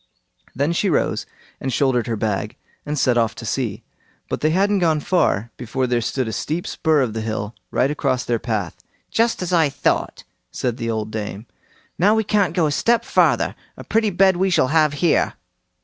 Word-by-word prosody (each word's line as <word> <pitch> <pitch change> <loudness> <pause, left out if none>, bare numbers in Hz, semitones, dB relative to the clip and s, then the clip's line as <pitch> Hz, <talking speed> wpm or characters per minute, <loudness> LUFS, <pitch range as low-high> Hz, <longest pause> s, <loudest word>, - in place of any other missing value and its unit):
Then 140 +6 +1
she 195 +3 +1
rose 160 - 0 0.3
and 130 - -3
shouldered 125 -2 +1
her 115 - -1
bag, 105 -2 -2 0.3
and 150 +1 -2
set 125 -3 +3
off 115 -1 0
to 115 - -8
see; 115 -1 -2 0.5
but - - -3
they 155 - +3
hadn't 195 +4 +2
gone 160 -4 +2
far, 120 - +1
before 130 +2 -2
there 120 -1 0
stood 130 +2 -2
a 110 - -4
steep 160 +9 -3
spur 160 -3 +1
of 120 -5 -1
the 110 - -3
hill, 110 -1 -3 0.2
right 135 +3 +1
across 130 -4 -1
their 120 -1 0
path. 105 -9 -2 0.4
"Just 230 -4 +1
as 180 0 -3
I 160 -4 +4
thought!" 140 +1 -1 0.3
said 125 -2 -2
the 115 -2 -3
old 110 -1 -2
dame; 105 0 -5 0.5
"now 205 +5 +4
we 220 - +2
can't 205 -2 +1
go 175 -4 +3
a 150 - +1
step 235 +10 +2
farther; - - +2 0.2
a - - -8
pretty 220 -1 +1
bed 190 -1 +3
we 190 +2 +2
shall 160 -8 +2
have 155 -1 +3
here!" 165 - +2
135 Hz, 195 wpm, -21 LUFS, 115-175 Hz, 0.5 s, I